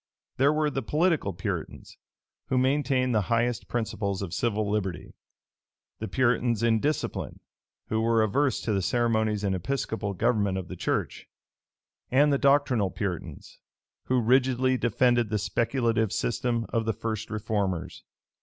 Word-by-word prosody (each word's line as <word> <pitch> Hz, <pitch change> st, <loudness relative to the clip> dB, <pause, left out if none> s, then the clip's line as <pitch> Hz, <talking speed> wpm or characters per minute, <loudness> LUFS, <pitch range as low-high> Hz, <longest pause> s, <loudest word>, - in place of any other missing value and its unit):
There 140 Hz, +3 st, +4 dB
were 155 Hz, -1 st, +1 dB
the 135 Hz, -, -2 dB
political 155 Hz, -, +1 dB
Puritans, 90 Hz, 0 st, -5 dB, 0.5 s
who 130 Hz, -, 0 dB
maintained 130 Hz, -1 st, +2 dB
the 110 Hz, -, +3 dB
highest 120 Hz, +1 st, 0 dB
principles 100 Hz, -4 st, -2 dB
of 90 Hz, -3 st, -6 dB
civil 110 Hz, 0 st, 0 dB
liberty; 100 Hz, -4 st, -3 dB, 0.9 s
the 110 Hz, -, -4 dB
Puritans 120 Hz, -3 st, +1 dB
in 115 Hz, -1 st, +3 dB
discipline, 150 Hz, +6 st, -2 dB, 0.5 s
who 110 Hz, 0 st, 0 dB
were 115 Hz, 0 st, +3 dB
averse 135 Hz, +6 st, +1 dB
to 110 Hz, -, -1 dB
the 100 Hz, -, +1 dB
ceremonies 110 Hz, -1 st, +1 dB
and 100 Hz, -1 st, +1 dB
Episcopal 100 Hz, 0 st, -3 dB
government 105 Hz, -3 st, +1 dB
of 95 Hz, -3 st, -6 dB
the -, -, -6 dB
church; -, -, -2 dB, 0.8 s
and 145 Hz, +3 st, +4 dB
the 140 Hz, -, +1 dB
doctrinal 135 Hz, -7 st, +3 dB
Puritans, 95 Hz, -3 st, -6 dB, 0.5 s
who 130 Hz, 0 st, +2 dB
rigidly 130 Hz, +2 st, +3 dB
defended 120 Hz, -1 st, +2 dB
the 110 Hz, -, 0 dB
speculative 115 Hz, +2 st, 0 dB
system 120 Hz, -1 st, -1 dB
of 115 Hz, -2 st, -1 dB
the 110 Hz, -, 0 dB
first 110 Hz, +1 st, -4 dB
reformers. 105 Hz, -4 st, -2 dB
115 Hz, 140 wpm, -27 LUFS, 105-130 Hz, 0.9 s, There